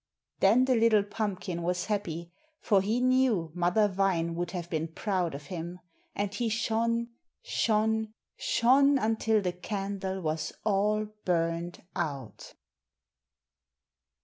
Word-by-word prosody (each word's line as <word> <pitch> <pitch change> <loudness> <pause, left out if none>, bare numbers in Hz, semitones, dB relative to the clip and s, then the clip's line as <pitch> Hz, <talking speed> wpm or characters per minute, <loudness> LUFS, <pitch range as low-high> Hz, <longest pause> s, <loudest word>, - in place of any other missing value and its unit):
Then 225 +7 +5
the 260 - +3
little 225 -3 +4
pumpkin 200 -4 -3
was 180 +1 -1
happy, 175 -5 -3 0.3
for 200 -4 +3
he 215 +5 0
knew 250 -10 +2
Mother 180 +5 +3
Vine 185 -4 0
would 175 +1 -2
have 175 -1 -5
been 160 -1 -2
proud 175 -1 -2
of 145 +1 -8
him, 175 +1 -5 0.4
and 205 0 -2
he 230 +3 -1
shone 230 +1 0 0.3
shone 220 0 +1 0.2
SHONE, 275 +4 +4
until 220 -2 +1
the 180 -1 -1
candle 195 0 -4
was 155 -1 -2
all 210 +1 +2 0.2
burned 170 0 -1
out. 140 - -5
195 Hz, 120 wpm, -29 LUFS, 175-220 Hz, 0.4 s, Then